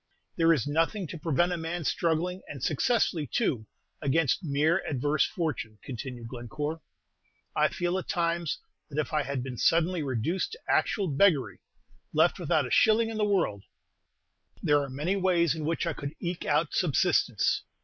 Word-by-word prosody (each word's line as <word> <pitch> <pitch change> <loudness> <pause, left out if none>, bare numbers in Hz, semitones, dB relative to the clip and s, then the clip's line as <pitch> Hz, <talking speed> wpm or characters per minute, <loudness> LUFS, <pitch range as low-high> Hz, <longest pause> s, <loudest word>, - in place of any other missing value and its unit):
"There 165 -1 +4
is 145 -9 +2
nothing 165 +7 0
to 170 - -7
prevent 175 +3 +1
a 175 - -1
man 165 +1 -4
struggling, 170 +4 0
and 140 -4 -8
successfully 160 - +1
too, 110 -1 -1 0.3
against 150 +4 +1
mere 155 +4 +2
adverse 145 +1 +1
fortune," 145 - -3
continued 125 -2 -6
Glencore. 145 +7 -5 0.7
"I - - +4
feel 175 +1 -2
at - - -8
times 170 -3 0 0.3
that 145 - -8
if 155 - -2
I 155 - +3
had 140 -2 -3
been 125 -2 -6
suddenly 170 +4 +2
reduced 140 - -1
to 470 - -9
actual 200 -3 +1
beggary, 150 -1 +2 0.6
left - - +3
without - - +1
a - - -7
shilling 225 +1 +4
in 220 - -5
the 215 - +1
world, 175 - 0 1.0
there 145 -1 +4
are 140 - -4
many 150 +9 -1
ways 175 -5 +2
in 160 -2 -4
which 165 +1 -1
I - - -1
could 140 +1 -6
eke 175 0 -4
out 150 +1 +1
subsistence. 155 - +2
160 Hz, 165 wpm, -28 LUFS, 140-175 Hz, 1.0 s, There